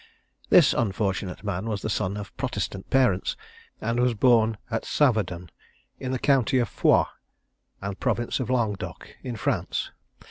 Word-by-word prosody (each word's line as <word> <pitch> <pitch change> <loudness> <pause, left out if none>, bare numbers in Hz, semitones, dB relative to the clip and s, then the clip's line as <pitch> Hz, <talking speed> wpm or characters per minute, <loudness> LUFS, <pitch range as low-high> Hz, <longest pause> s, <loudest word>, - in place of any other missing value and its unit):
This 165 -6 +7
unfortunate 100 -4 -1
man 100 0 -3
was 105 -3 -3
the - - -1
son 100 0 -1
of 105 -1 -8
Protestant 95 -1 -4
parents, 125 -9 +2 0.4
and 115 +2 -1
was 125 -1 +2
born 115 -1 +4
at 115 - -1
Saverdun, 100 - +1 0.5
in 130 - -3
the 130 - 0
county 130 -1 +3
of 120 -4 +1
Foix, - - +4 0.8
and 100 -1 -4
province 120 +3 0
of 125 - -3
Languedoc, 115 -6 -2
in 125 -2 -5
France. 110 - -2
110 Hz, 145 wpm, -26 LUFS, 100-125 Hz, 0.8 s, This